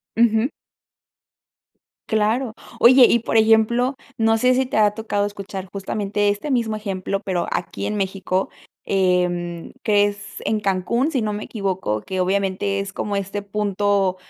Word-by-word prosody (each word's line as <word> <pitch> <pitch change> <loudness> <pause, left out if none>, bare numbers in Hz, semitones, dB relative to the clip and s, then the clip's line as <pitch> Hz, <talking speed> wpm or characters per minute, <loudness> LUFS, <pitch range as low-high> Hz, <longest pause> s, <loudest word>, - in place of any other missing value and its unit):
Ujú. 225 0 +3 1.6
Claro. 220 +3 +1 0.3
Oye, 255 +2 +8
y 235 - +4
por 230 - -3
ejemplo, 225 +4 +4 0.2
no 225 0 +3
sé 250 +2 +3
si 260 +1 +2
te 250 - -3
ha 210 -1 +5
tocado 210 -2 -1
escuchar 200 -2 -6
justamente 205 +1 -1
este 205 +9 -2
mismo 230 -4 0
ejemplo, 195 -2 -3
pero 185 -4 -2
aquí 175 - -3
en 210 - -2
México, 190 -1 -1 0.4
em, 180 -3 0
crees 205 -1 +1
en 215 -1 0
Cancún, 200 - 0
si 265 -6 0
no 210 -1 -1
me 210 - -4
equivoco, 190 - -2
que 190 -1 -2
obviamente 195 +1 0
es 195 -1 -5
como 205 -1 -2
este 200 +1 -3
punto 200 -2 0
205 Hz, 145 wpm, -21 LUFS, 195-220 Hz, 1.6 s, Oye